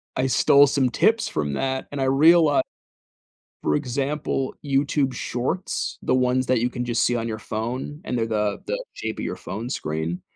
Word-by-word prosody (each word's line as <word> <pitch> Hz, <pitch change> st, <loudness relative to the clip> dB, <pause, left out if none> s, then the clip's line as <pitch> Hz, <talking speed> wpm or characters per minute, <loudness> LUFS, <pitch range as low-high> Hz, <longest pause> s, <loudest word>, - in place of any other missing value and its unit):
I 130 Hz, +1 st, +1 dB
stole 140 Hz, +2 st, +5 dB
some 135 Hz, -2 st, +2 dB
tips 225 Hz, -, +2 dB
from 75 Hz, -2 st, -2 dB
that, 130 Hz, -, -2 dB
and 145 Hz, -1 st, -3 dB
I -, -, +2 dB
reali 150 Hz, +3 st, +5 dB, 1.0 s
for -, -, +1 dB
example, 140 Hz, 0 st, -2 dB
YouTube 140 Hz, -1 st, +1 dB
Shorts, 130 Hz, +10 st, -3 dB
the -, -, +1 dB
ones 130 Hz, 0 st, +2 dB
that 125 Hz, -3 st, +2 dB
you 120 Hz, -, +1 dB
can 125 Hz, 0 st, -4 dB
just 120 Hz, -1 st, +1 dB
see 120 Hz, -, +2 dB
on 115 Hz, -, -2 dB
your 110 Hz, -1 st, -4 dB
phone, 120 Hz, +8 st, -4 dB
and 125 Hz, -, -2 dB
they're 115 Hz, -, +1 dB
the 105 Hz, -2 st, -1 dB
the -, -, -2 dB
shape -, -, -5 dB
of -, -, -3 dB
your -, -, -3 dB
phone 110 Hz, +5 st, -6 dB
screen. 80 Hz, -, -3 dB
130 Hz, 185 wpm, -24 LUFS, 115-140 Hz, 1.0 s, stole